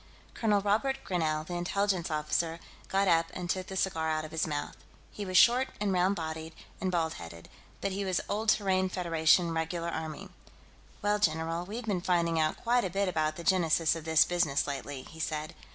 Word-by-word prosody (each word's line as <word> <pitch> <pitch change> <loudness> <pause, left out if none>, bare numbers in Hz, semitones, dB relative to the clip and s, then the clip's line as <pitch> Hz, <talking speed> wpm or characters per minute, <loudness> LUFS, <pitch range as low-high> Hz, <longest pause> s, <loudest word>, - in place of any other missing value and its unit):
Colonel 210 -3 +2
Robert 220 +7 +1
Grinell, 155 -4 0
the 175 - -6
Intelligence 185 +1 0
officer, 160 +2 -1 0.3
got 195 +1 +1
up 165 -1 +4
and 180 -1 -4
took 185 +1 -3
the 190 - -6
cigar 165 -4 0
out 155 0 -1
of 155 - -10
his 160 0 -1
mouth. 145 -1 -3 0.4
He 205 - -6
was 185 -1 +1
short 250 +2 +6
and 205 -2 0
round 185 +2 +2
bodied 160 -1 -5 0.3
and 185 - 0
bald 165 -2 0
headed, 85 0 -10 0.3
but 195 - -1
he 200 +1 -2
was 185 -2 0
old 215 +2 -1
Terran 190 -3 +2
Federation 170 -1 +2
Regular 165 +1 -2
Army. 160 -2 -5 0.7
"Well, 210 0 +2
general, 165 -1 0
we've 225 +4 -5
been 195 -5 -1
finding 170 -2 +1
out 155 0 +1
quite 245 +1 +3
a 190 - -1
bit 195 +2 0
about 155 -3 0
the 170 - -7
genesis 165 -3 +3
of 165 -1 -7
this 160 -1 +5
business, 170 -5 +1
lately," 140 -1 -5
he 160 - -13
said. 155 +1 -3
170 Hz, 195 wpm, -30 LUFS, 160-195 Hz, 0.7 s, short